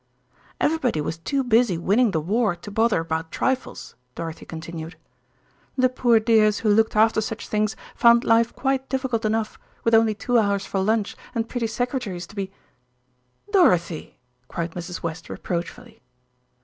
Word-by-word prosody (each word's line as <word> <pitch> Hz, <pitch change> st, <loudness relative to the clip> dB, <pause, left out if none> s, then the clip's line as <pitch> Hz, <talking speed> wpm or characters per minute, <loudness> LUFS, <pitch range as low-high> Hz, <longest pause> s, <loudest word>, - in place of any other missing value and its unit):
"Everybody 280 Hz, -, +1 dB
was 160 Hz, +2 st, -3 dB
too 270 Hz, +11 st, -1 dB
busy 230 Hz, -6 st, +3 dB
winning 215 Hz, +8 st, +3 dB
the 165 Hz, -, 0 dB
war 200 Hz, +4 st, +1 dB
to 190 Hz, +4 st, -10 dB
bother 225 Hz, -4 st, +2 dB
about 160 Hz, 0 st, -3 dB
trifles," 260 Hz, -1 st, -2 dB, 0.2 s
Dorothy 165 Hz, -1 st, -6 dB
continued. 165 Hz, 0 st, -7 dB, 0.8 s
"The 255 Hz, 0 st, +4 dB
poor 240 Hz, -2 st, +3 dB
dears 215 Hz, -2 st, +3 dB
who 215 Hz, -2 st, +3 dB
looked 220 Hz, +1 st, +2 dB
after 220 Hz, +1 st, +4 dB
such 220 Hz, +1 st, -5 dB
things 215 Hz, 0 st, 0 dB, 0.2 s
found 235 Hz, 0 st, +5 dB
life 230 Hz, +1 st, +3 dB
quite 265 Hz, 0 st, -1 dB
difficult 260 Hz, -4 st, -1 dB
enough, 220 Hz, 0 st, -1 dB, 0.2 s
with 230 Hz, -, +1 dB
only 225 Hz, -1 st, +5 dB
two 240 Hz, +3 st, +1 dB
hours 200 Hz, -2 st, 0 dB
for 195 Hz, -, -2 dB
lunch 210 Hz, +1 st, 0 dB, 0.2 s
and 230 Hz, 0 st, -1 dB
pretty 235 Hz, -2 st, -2 dB
secretaries 230 Hz, -6 st, -3 dB
to 205 Hz, -, -16 dB
be 195 Hz, -1 st, -4 dB, 0.5 s
" 125 Hz, -, -28 dB
"Dorothy!" 180 Hz, -, +2 dB, 0.3 s
cried 170 Hz, 0 st, -4 dB
Mrs. 175 Hz, +1 st, -7 dB
West 165 Hz, 0 st, -5 dB
reproachfully. 225 Hz, +7 st, -5 dB
215 Hz, 155 wpm, -23 LUFS, 175-235 Hz, 0.8 s, found